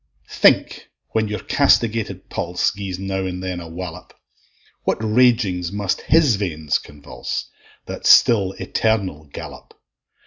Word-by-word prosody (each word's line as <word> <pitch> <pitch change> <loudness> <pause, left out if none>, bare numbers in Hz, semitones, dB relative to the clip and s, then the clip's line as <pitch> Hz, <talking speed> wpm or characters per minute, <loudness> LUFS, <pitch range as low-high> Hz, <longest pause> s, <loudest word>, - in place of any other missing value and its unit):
Think, - - +3 0.2
when 110 -1 0
your 105 0 -4
castigated 115 -1 +1
pulse 90 +1 -1
Gies 95 -3 -5
now 95 0 -3
and 90 0 -5
then 90 -1 -3
a 85 - -8
wallop! 85 0 -8 0.7
What - - 0
ragings 110 -6 +2
must 100 -2 -2
his 150 -10 +3
veins 80 -7 -1
convulse, 70 -4 -7 0.3
That - - -4
still 100 -5 +5
eternal 95 -11 -1
gallop! 70 - -11
95 Hz, 125 wpm, -21 LUFS, 90-110 Hz, 0.7 s, still